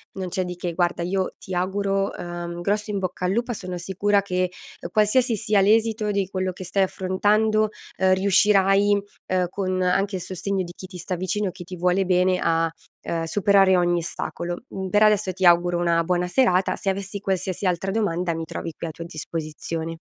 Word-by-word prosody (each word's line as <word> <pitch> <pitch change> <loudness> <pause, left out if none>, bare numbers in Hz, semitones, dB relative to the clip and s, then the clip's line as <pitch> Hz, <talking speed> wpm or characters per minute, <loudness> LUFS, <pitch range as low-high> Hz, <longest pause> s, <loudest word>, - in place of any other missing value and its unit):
Non 190 -2 -4
c'è 185 +1 -1
di 180 0 -5
che, 175 -1 -4
guarda, 175 0 0
io 185 +1 -1
ti 190 - -8
auguro, 195 +2 0
ehm, 175 0 -5
un 175 - -6
grosso 210 +3 -1
in 205 - -1
bocca 185 -1 -3
al 180 - +1
lupa. 235 +3 -1
Sono 185 -4 -6
sicura 195 +3 +1
che, 185 -1 0 0.3
uhm, 170 - -6
qualsiasi 220 +3 +3
sia 210 -2 +2
l'esito 220 +1 +2
di 200 -2 0
quello 185 -1 -2
che 185 - -9
stai 190 +2 +1
affrontando, 210 +4 +1 0.3
ehm, 185 0 +4
riuscirai, 200 +1 +4 0.3
ehm, 185 -1 +1
con 185 -1 -2
anche 195 +2 +1
il 185 - -3
sostegno 190 +1 -2
di 175 0 -9
chi 185 - -9
ti 180 -1 -10
sta 180 +1 -3
vicino, 185 +2 -1
chi 175 - -10
ti 180 +1 -8
vuole 180 +2 +1
bene, 180 0 +2
a, 165 0 +1 0.3
ehm, 165 -1 -2
superare 195 +1 +4
ogni 175 -1 +2
ostacolo. 170 +2 -5
Mhmm, 190 -1 -5
per 210 +2 +4
adesso 210 -3 +3
ti 185 0 -1
auguro 175 0 +5
una 170 -1 +2
buona 180 +1 0
serata, 185 -3 +2
se 195 - -2
avessi 195 +1 -3
qualsiasi 190 -1 -2
altra 180 +2 0
domanda 180 -5 0
mi 165 0 -4
trovi 165 +1 -6
qui 170 - -5
a - - -5
tua 170 +2 -8
disposizione. 160 0 -5
185 Hz, 200 wpm, -24 LUFS, 175-200 Hz, 0.3 s, auguro